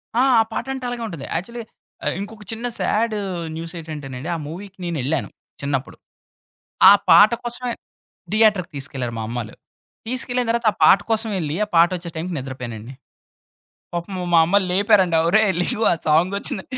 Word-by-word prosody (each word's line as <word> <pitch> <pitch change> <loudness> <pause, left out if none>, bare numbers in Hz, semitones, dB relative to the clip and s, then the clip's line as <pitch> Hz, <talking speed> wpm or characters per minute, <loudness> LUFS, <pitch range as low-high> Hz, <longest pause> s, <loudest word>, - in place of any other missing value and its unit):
ఆ! 245 - +4 0.2
ఆ - - +6
పాటంటే 265 +1 -4
అలాగే 240 -1 -4
ఉంటది. 165 -8 -7
యాక్చువల్లీ 235 +7 -4 0.4
అయ్ - - 0
ఇంకొక 210 +1 -8
చిన్న 225 +2 -5
సాడు 215 0 0 0.4
న్యూసేంటంటేనండి, 155 -4 -7
ఆ - - -3
మూవీకి 195 +4 -9
నేనెళ్ళాను 155 -3 -2 0.3
చిన్నప్పుడు. 140 -2 -3 0.9
ఆ - - +10 0.2
పాట 210 +1 +8
కోసమే 240 0 -3 0.6
థియేటర్‌కి 210 -5 +3
తీసుకెళ్లారు 130 -3 -4
మా - - -3
అమ్మళ్ళు. 115 -2 -5 0.5
తీసుకెళ్ళిన 250 0 -1
తర్వాత 235 0 -1
ఆ - - -13
పాట 190 - +7
కోసం 220 0 0
ఎళ్లి, 155 -1 -2
ఆ - - -20
పాటొచ్చే 170 +1 +3
టైంకి 170 +3 -4
నిద్రపోయానండి. 125 -3 -7 1.0
పాపం 175 +3 -4 0.2
మా 165 - +7
అమ్మళ్ళు 195 +1 +2
లేపారంట, 195 -3 +3
"ఒరేయ్! 210 0 +4
లెగు 220 +5 -1
ఆ - - +4
సాంగొచ్చింది" 185 +5 +1
180 Hz, 145 wpm, -21 LUFS, 155-220 Hz, 1.0 s, ఆ